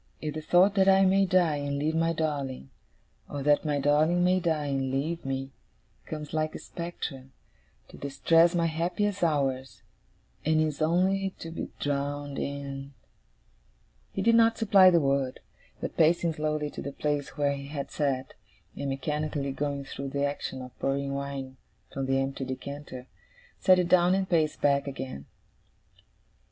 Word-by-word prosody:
If 150 -1 -4
the 155 - -4
thought 180 +5 +4
that 195 -1 +4
I 195 0 +6
may 195 +1 +4
die 175 -5 +3
and 145 0 -2
leave 150 +3 0
my 165 +1 +2
darling, 140 - -3 0.6
or 145 -1 -4
that 145 +1 +3
my 150 -1 +1
darling 155 +5 +3
may 185 +1 +3
die 160 -4 0
and 135 -2 -1
leave 150 +6 -2
me, 135 0 -3 0.6
comes 150 -1 -6
like 155 0 -1
a - - -3
spectre, 165 -6 -6 0.6
to - - -12
distress 165 +5 +3
my 170 -1 +2
happiest 180 +5 -1
hours, 135 -5 -1 0.6
and 155 0 +2
is 155 -1 0
only 190 +4 +1
to 165 - -8
be 165 - -5
drowned 145 0 -2
in 140 -1 -5 0.6
' - - -38
He - - -1
did 230 - +4
not 230 0 +5
supply 195 -4 +6
the 170 -2 +4
word; 135 -3 0 0.4
but - - -5
pacing 165 +1 +3
slowly 150 -1 -2
to - - -7
the 140 - -5
place 145 -1 -2
where 145 -1 +2
he 140 0 -8
had 140 -1 -5
sat, 135 -3 -1 0.4
and 140 - -3
mechanically 145 +1 -2
going 140 0 -3
through 135 0 -6
the 140 +1 0
action 140 -2 -4
of 125 - -13
pouring 140 0 -1
wine 140 -1 -5 0.4
from 135 -1 -3
the 135 0 +2
empty 135 0 -2
decanter, 130 0 -7 0.5
set 185 -1 +5
it 180 -1 +1
down 180 0 +5
and 190 -1 0
paced 160 -4 +1
back 140 0 +2
again. 130 - -6
145 Hz, 165 wpm, -28 LUFS, 140-165 Hz, 0.6 s, I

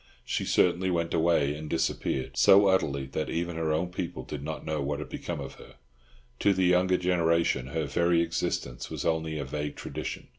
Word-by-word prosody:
She - - -1
certainly 90 +1 +2
went 85 -2 -1
away 80 -3 +2
and 75 +1 -7
disappeared 65 - -1
so 100 +1 +7
utterly 70 -8 +1
that 75 - -2
even 85 0 -2
her 80 -1 -1
own 80 +3 0
people 90 -1 -4
did 75 -3 -6
not 80 +1 -5
know 80 -1 -2
what 70 +1 -2
had 75 -2 -7
become 85 -3 -5
of 65 -1 -6
her; - - -15 0.6
to 100 - +4
the 95 0 +2
younger 90 +1 +3
generation 85 -7 +1
her 80 +2 -2
very 85 +4 +2
existence 65 -7 -3
was - - -5
only 80 -1 0
a 70 - -3
vague 75 +2 -4
tradition. - - -6
80 Hz, 190 wpm, -28 LUFS, 75-85 Hz, 0.6 s, so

